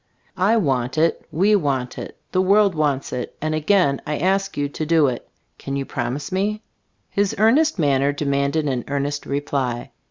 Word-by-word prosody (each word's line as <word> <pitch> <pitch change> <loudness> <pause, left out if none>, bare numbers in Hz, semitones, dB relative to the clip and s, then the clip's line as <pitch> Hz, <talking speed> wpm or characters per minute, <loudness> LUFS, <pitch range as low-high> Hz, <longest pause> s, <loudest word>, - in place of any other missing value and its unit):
I 205 +5 +4
want 130 - 0
it; 165 +1 +1
we 200 +6 +3
want 135 -8 -1
it; - - -8
the 185 - +2
world 200 +1 +4
wants 145 -4 -1
it, 125 - -5
and 155 +1 -2
again 155 -2 +2
I 150 0 -1
ask 195 +3 0
you 145 0 0
to 145 - -5
do 160 -1 +3
it. 125 -3 -3 0.3
Can 135 - -4
you 140 -1 -2
promise 130 +6 -4
me?" 210 +3 -1 0.5
His 200 -1 0
earnest 260 +9 +4
manner 140 -3 +2
demanded 145 +1 0
an 130 -3 -1
earnest 140 +1 -2
reply. 140 -4 -2
150 Hz, 170 wpm, -22 LUFS, 140-190 Hz, 0.5 s, I